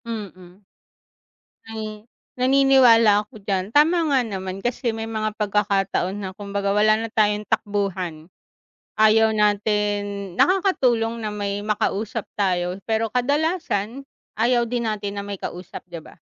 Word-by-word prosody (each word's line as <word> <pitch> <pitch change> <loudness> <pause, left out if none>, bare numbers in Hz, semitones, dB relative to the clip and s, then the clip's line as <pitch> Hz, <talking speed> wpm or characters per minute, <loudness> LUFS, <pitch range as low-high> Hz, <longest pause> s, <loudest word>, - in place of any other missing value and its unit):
Mm. 195 -5 -8 1.1
Mm. 215 0 -7 0.3
Naniniwala 250 -5 +5
ako 215 -3 -15
diyan, 195 +2 -2
tama 325 +3 +4
nga 280 -3 +3
naman. 190 -2 -5
Kasi 240 -1 -1
may 225 0 -4
mga 215 -1 -3
pagkakataon 200 -2 0
na 195 -2 -5
kumbaga, 200 0 -3
wala 215 +1 +4
na 225 +1 -4
tayong 210 -1 +1
takbuhan. 185 -7 -2 0.7
Ayaw 220 0 +5
natin 205 -2 0
nakakatulong 250 - +2
na 215 - -2
may 200 -1 -3
makausap 215 +1 -1
tayo 180 -1 0
pero 225 0 0
kadalasan, 275 - -1 0.3
ayaw 240 +1 +3
din 240 -1 -1
natin 205 -1 -4
na - - -5
may 200 -1 -5
kausap, 180 +1 -7
di 170 -1 -7
ba? - - -15
210 Hz, 130 wpm, -22 LUFS, 200-230 Hz, 1.1 s, Naniniwala